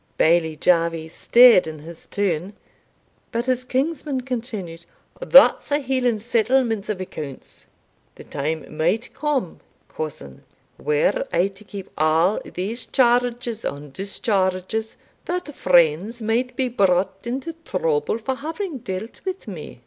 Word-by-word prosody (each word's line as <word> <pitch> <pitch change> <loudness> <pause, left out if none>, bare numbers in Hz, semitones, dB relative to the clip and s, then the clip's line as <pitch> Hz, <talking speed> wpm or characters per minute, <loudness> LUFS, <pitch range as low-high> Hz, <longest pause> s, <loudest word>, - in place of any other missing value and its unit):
Bailie 160 -1 +3
Jarvie 165 -1 +1
stared 235 +1 +6
in 155 0 -6
his 160 +2 -11
turn, 190 -1 -1 0.8
but 235 0 -1
his 255 -1 0
kinsman 270 +1 -1
continued, 220 -10 -5 0.4
"That's - - +6
a 290 - +4
Hieland 250 -5 0
settlement 230 -2 +1
of 210 -3 -2
accounts. 150 -7 -8 0.5
The - - -11
time 155 +2 -4
might 190 +10 0
come, 280 - -2 0.3
cousin, 135 - -7 0.4
were 150 -1 +1
I 180 +3 +2
to 195 +1 -15
keep 200 -2 -8
a' 160 +6 +3
these 205 +7 -4
charges 245 -2 +1
and 145 -1 -5
discharges, 195 - -1 0.3
that 355 -4 -3
friends 180 +6 +3
might 240 +3 -1
be 260 0 0
brought 195 -2 +1
into 265 +7 -3
trouble 165 - 0
for 230 +4 -2
having 320 +3 -5
dealt 190 +1 -6
with 375 -6 -5
me." 170 - -8
210 Hz, 125 wpm, -22 LUFS, 170-250 Hz, 0.8 s, stared